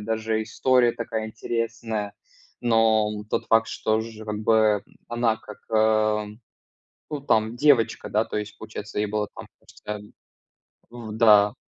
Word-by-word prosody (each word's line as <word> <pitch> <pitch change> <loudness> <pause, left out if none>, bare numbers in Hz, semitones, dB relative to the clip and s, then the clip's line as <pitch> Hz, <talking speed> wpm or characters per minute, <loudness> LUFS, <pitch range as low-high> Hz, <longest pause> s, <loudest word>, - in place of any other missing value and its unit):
даже 110 +1 -1
история 120 +1 +2
такая 115 -1 -4
интересная. 110 -2 -3 0.5
Но 110 -3 +2
тот - - -1
факт, 115 0 +4
что 110 0 0
же 110 -1 -8
как 105 -1 -4
бы 110 -1 +3 0.2
она 120 -1 +1
как, 105 -1 -12
ам. 110 -1 +1 0.7
Ну, 150 -2 -4
там 110 -4 +1
девочка, 135 -3 +3
да, - - +1
то - - -7
есть 105 0 -5
получается 110 -1 -8
ей 105 - +1
там 105 - -7
было 105 -1 -1
там, - - -9
кажется - - -20
а - - -7 0.9
в, 120 -2 -8
да, 105 -2 +6
110 Hz, 150 wpm, -25 LUFS, 105-115 Hz, 0.9 s, да